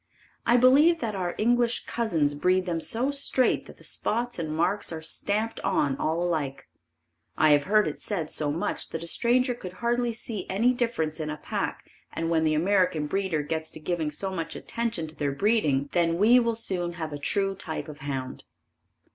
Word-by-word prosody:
I 240 - +6
believe 280 +7 +6
that 225 -7 -2
our 180 -3 -2
English 240 +1 +2
cousins 165 -11 0
breed 180 +5 +2
them 170 -3 -2
so 250 - +1
straight 275 -2 +1
that - - -13
the - - -18
spots 240 -1 -1
and 160 -2 -3
marks 175 +6 0
are 160 -1 -5
stamped 215 +7 -1
on 150 -8 +1
all 165 +2 0
alike. 145 -6 -2 0.7
I 155 -1 +5
have 145 -1 +4
heard 215 +1 +3
it - - -4
said 170 -7 -3
so 150 -2 +1
much 160 - -2
that 165 - -5
a - - -7
stranger 250 +6 +2
could 185 -6 -8
hardly 240 +3 0
see 225 -4 -5
any 230 +7 +3
difference 230 -11 -1
in 155 -1 -3
a 150 - -4
pack - - -4 0.2
and 165 0 -2
when 160 -1 +2
the 155 0 +2
American 180 -2 +2
breeder 180 -2 -1
gets 160 +1 -3
to - - -8
giving 160 0 -1
so 190 +6 -3
much 165 -3 -4
attention 230 -8 -3
to 155 0 -10
their 145 -2 -1
breeding, 150 -7 +2
then 170 -1 +2
we 230 +6 +6
will 230 -1 0
soon 180 -6 -2
have 160 -3 -5
a 145 - -5
true 195 +6 0
type 160 -5 -5
of 150 -1 -9
hound. 135 -2 -5
180 Hz, 195 wpm, -27 LUFS, 155-230 Hz, 0.7 s, I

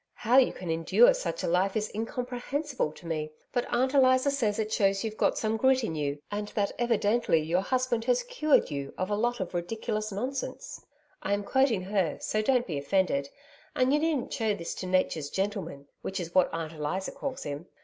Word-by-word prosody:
How 245 +3 +4
you 260 - +4
can 175 -3 -5
endure 315 - +5
such - - -3
a - - 0
life 185 +3 +2
is 215 0 -2
incomprehensible 250 - -3
to 170 - -15
me 155 -2 -2 0.2
but 245 -1 0
Aunt 260 +3 +1
Eliza 260 0 +5
says 225 -7 0
it 215 -1 -2
shows 195 -2 +2
you've 220 -1 -3
got - - +1
some 220 0 0
grit 260 +1 +3
in 165 - -2
you, 145 -2 -2
and 205 0 -3
that 200 -2 +1
evidently 225 -5 +2
your 165 +4 +1
husband 250 +1 0
has - - +2
cured - - +2
you 140 -1 -5
of 185 +2 -2
a - - +2
lot 240 +3 0
of 185 - -4
ridiculous 215 +4 -3
nonsense 255 +7 -4 0.4
I 195 - -1
am 205 0 0
quoting 255 -4 +2
her, 190 -4 0
so 215 - -1
don't 250 +2 +2
be 150 -6 -3
offended, 140 -2 +1 0.5
and 255 +2 +3
you 295 - +4
needn't 310 -5 -1
show 220 -3 0
this 170 -4 -5
to 185 - -4
Nature's 180 -5 +1
gentleman, 190 -8 -3
which 190 +1 -4
is 170 -1 -5
what 185 -1 +4
Aunt 165 -1 -4
Eliza 155 +5 -3
calls 270 -2 -5
him. 145 +4 -6
210 Hz, 200 wpm, -28 LUFS, 180-255 Hz, 0.5 s, endure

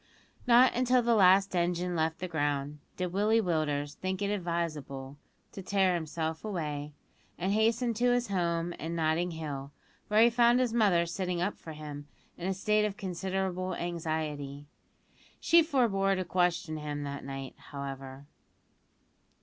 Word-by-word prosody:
Not 245 +1 +6
until 250 0 +3
the 235 0 +3
last 195 -2 +5
engine 175 0 0
left 160 0 0
the 185 - -4
ground, 145 -2 -2 0.2
did 180 -1 -3
Willie 210 +3 +3
Willders 150 -6 -1
think 185 +4 -3
it 200 - 0
advisable 155 -7 -3 0.3
to 195 - -8
tear 190 -1 +2
himself 160 -1 -3
away, 150 -8 -4 0.4
and 185 +3 -1
hasten 230 +2 +2
to 245 +3 +2
his 245 -2 +1
home 170 -2 0
in 165 +2 -4
Notting 165 +2 +1
Hill, 145 -4 -5 0.4
where 215 +1 +5
he 235 - +5
found 240 +1 +4
his 250 -3 +1
mother 200 -7 +3
sitting 180 +1 -2
up 195 +4 -1
for 160 - -10
him 150 -1 -8 0.3
in 175 - -5
a 190 - +1
state 210 +3 +2
of 205 -1 -3
considerable 185 0 -2
anxiety. 155 -4 -3 0.7
She 335 0 +5
forebore 225 -11 +2
to 185 -1 -2
question 175 -3 0
him 150 -1 -4
that 140 0 -5
night, 135 -1 -6 0.2
however. 135 -1 -7
175 Hz, 150 wpm, -30 LUFS, 150-200 Hz, 0.7 s, Not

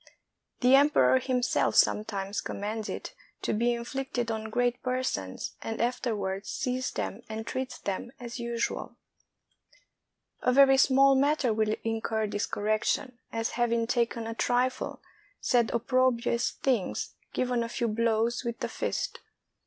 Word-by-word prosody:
The 250 +1 +5
emperor 285 -2 +5
himself 255 -1 +1
sometimes 200 -1 +2
commands 210 +2 -4
it - - -5 0.3
to - - 0
be 235 +3 +2
in 235 0 -2
flicted 245 -2 -3
on 220 0 -4
great 245 +2 0
persons, 250 - -2
and 225 0 -4
afterwards 215 -5 -1
sees 255 -1 -1
them - - -4
and 220 0 -5
treats 260 0 -4
them 200 +4 -4
as 240 0 -7
usual. 235 0 -3 1.5
A 250 - +3
very 270 +1 +7
small 270 0 +6
matter 275 -3 +2
will 215 0 +1
incur 225 -1 -1
this 205 0 -2
correction; 215 +4 -1
as 225 0 -1
having 235 -1 +2
taken 235 -1 0
a 225 - -3
trifle, 250 +2 0 0.4
said 240 -3 +2
opprobrious 240 0 +1
things, 245 -8 -1 0.2
given 250 -1 0
a 230 - -2
few 235 0 -1
blows 230 +2 +1
with 235 -1 -4
the - - -1
fist. - - -3
235 Hz, 135 wpm, -29 LUFS, 220-255 Hz, 1.5 s, very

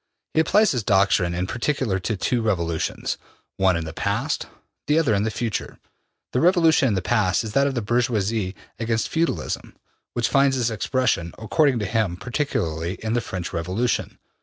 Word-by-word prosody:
He - - +2
applies 210 +7 +4
his 125 - 0
doctrine 95 -4 +3
in 90 +1 -1
particular 120 -2 -1
to 105 +3 -2
two 120 +5 0
revolutions, 85 -7 -1 0.4
one 95 -2 +3
in 85 - -3
the 80 - -6
past, - - -1 0.4
the 150 +2 +3
other 150 -9 +3
in 100 - +2
the 110 - 0
future. 110 -1 -3 0.6
The 125 - +2
revolution 165 -4 +4
in 110 - +1
the 95 - -1
past 105 -4 +2
is 110 - -5
that 140 +3 +4
of 135 - -2
the 120 - -1
bourgeoisie 110 -4 0 0.2
against 115 -1 0
feudalism, 160 - -2 0.4
which 120 -1 +1
finds 135 -1 +3
its 120 -2 +1
expression, 110 -7 0
according 135 +4 +2
to 105 - -1
him, 105 -4 0
particularly 85 - -2
in 110 0 -1
the 120 - +1
French 90 -3 -5
Revolution. 95 +9 -1
110 Hz, 175 wpm, -23 LUFS, 95-130 Hz, 0.6 s, applies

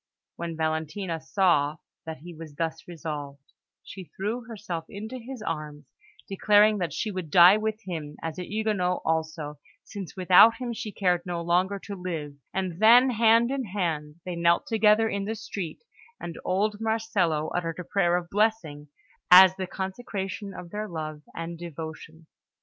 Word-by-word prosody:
When 170 -1 -5
Valentina 160 +2 -2
saw 160 -4 +2 0.3
that 160 - -5
he 175 +2 -10
was 155 -2 -11
thus 160 0 -3
resolved, 145 -5 -7 0.3
she 190 -1 -9
threw 220 +7 -4
herself 200 -8 -6
into 220 +5 -7
his 245 -1 -8
arms, 150 -3 -5 0.4
declaring 210 +1 +4
that 175 -4 -2
she 215 +8 -3
would 185 -5 -5
die 175 +5 +8
with 220 0 -3
him 160 -6 -6
as 165 +1 -4
a - - -3
Huguenot 210 -4 0
also, 160 -2 -2 0.2
since 200 -3 -8
without 185 +5 +7
him 240 0 -4
she 215 -1 -5
cared 180 -4 +1
no 175 -1 -4
longer 180 +4 +1
to 200 - -6
live; 165 -6 -5 0.2
and 185 -3 -3
then, 240 +4 +7
hand 230 +1 +4
in 270 -2 -2
hand, 165 -7 -3
they 180 -1 -4
knelt 170 0 +2
together 220 0 +4
in 200 -2 -2
the 220 +2 -3
street, 200 - -6 0.4
and 170 - -6
old 205 +3 0
Marcello 215 -9 0
uttered 165 -2 -3
a 180 - -5
prayer 175 -1 +1
of 175 -1 -5
blessing, 200 -9 0 0.4
as 185 +1 +9
the 190 -1 -4
consecration 195 +1 -5
of 175 -2 -10
their 210 +1 -4
love 155 -4 -6
and 165 0 -6
devotion. 160 -1 -8
180 Hz, 160 wpm, -26 LUFS, 160-210 Hz, 0.4 s, as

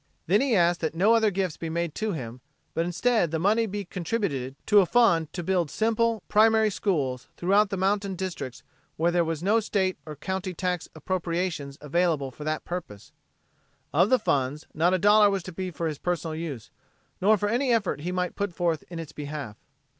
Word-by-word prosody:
Then 200 +7 +3
he 270 -4 +2
asked 175 -1 +3
that 160 -1 -2
no 200 +7 +4
other 225 -2 +4
gifts 185 -4 -2
be 165 - -5
made 170 -1 -2
to 220 0 -2
him, 125 -7 -6 0.3
but 165 +1 0
instead 180 +1 +1
the 160 - -1
money 215 +7 +2
be 205 0 -4
contributed 170 - -3
to 210 -1 +6
a 190 - +4
fund 170 -10 +3
to 175 - -4
build 175 -3 +1
simple, 225 +2 +1
primary 220 0 +4
schools 135 -11 -1
throughout 200 +3 +3
the 195 - -3
mountain 195 +1 0
districts 170 -9 -5 0.3
where 170 +2 +2
there 175 0 +3
were 165 0 -1
no 210 +4 +4
state 195 -4 -1
or 155 - -6
county 190 +4 -4
tax 180 -1 -2
appropriations 170 -3 -2
available 150 -2 0
for 150 - -10
the 155 0 -1
purpose. 150 - -7 0.8
Of 175 +7 +4
the 255 - +5
fund, 145 - -1
not 175 +4 +3
a - - +2
dollar 205 +2 +6
was 195 -2 -1
to 185 - -7
be 185 +2 -4
for 170 0 -4
his 155 -3 -3
personal 170 -2 -2
use, 155 -8 -6 0.5
nor 210 +3 +5
for 205 - -1
any 245 +4 +1
effort 205 -10 +1
he 175 +4 -3
might 180 0 -2
put 200 -4 -3
forth 170 -4 0
in 175 - -7
its 165 -3 -6
behalf. 145 -7 -6
180 Hz, 200 wpm, -26 LUFS, 160-205 Hz, 0.8 s, to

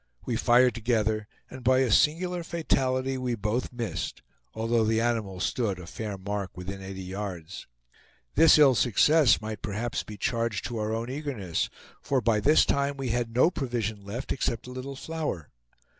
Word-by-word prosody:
We 120 - -1
fired 120 +2 +4
together, 110 -2 0 0.2
and 130 -1 -10
by 130 +1 +4
a 130 -4 +1
singular 175 - +2
fatality 135 -6 0
we 125 -2 -1
both 105 +3 -2
missed, 120 -3 -4 0.3
although 115 +1 +1
the 110 +1 +2
animal 110 -5 -1
stood, 95 +2 -1
a 90 - -9
fair 105 +3 -5
mark, 100 0 -4
within 95 +2 -6
eighty 95 0 -7
yards. 95 -3 -6 0.7
This 165 - +7
ill 145 -3 +7
success 125 +3 +4
might 110 -1 -5
perhaps 110 +3 -2
be 105 - -10
charged 115 -1 -1
to 120 -2 -4
our 105 0 -1
own 115 +2 -3
eagerness, 130 - -2 0.3
for 135 - +1
by 115 -2 +2
this 150 +9 +5
time 140 0 0
we 135 -2 -3
had 115 -1 -1
no 145 +8 +5
provision 115 - -3
left 115 +7 -5
except 115 -3 -1
a 125 - -8
little 130 +2 -6
flour. 150 - -4
115 Hz, 170 wpm, -27 LUFS, 105-130 Hz, 0.7 s, This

